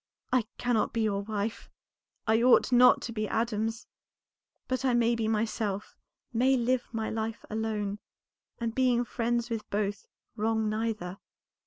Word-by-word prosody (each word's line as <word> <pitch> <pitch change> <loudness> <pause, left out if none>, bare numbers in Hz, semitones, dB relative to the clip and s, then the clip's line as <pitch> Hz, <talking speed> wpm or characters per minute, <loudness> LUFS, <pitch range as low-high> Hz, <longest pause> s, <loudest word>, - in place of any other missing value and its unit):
I 245 -4 +3
cannot 240 -3 +1
be 230 - 0
your 205 -2 +1
wife, 210 +1 -4 0.6
I 225 +1 +3
ought 250 +1 +5
not 250 0 +6
to - - -4
be 215 -1 -2
Adam's; 225 0 -1 0.8
but 255 0 -1
I 255 -2 +3
may 235 0 +3
be 230 -2 -1
myself, 215 -2 -1 0.4
may 260 +3 +3
live 245 +1 0
my 225 -1 -2
life 220 0 -3
alone, 210 -2 -2 0.6
and 230 -1 -2
being 245 -1 +2
friends 235 0 -1
with 220 -2 -4
both 205 0 -2 0.3
wrong 220 0 0
neither. 215 -4 -2
225 Hz, 145 wpm, -29 LUFS, 215-240 Hz, 0.8 s, not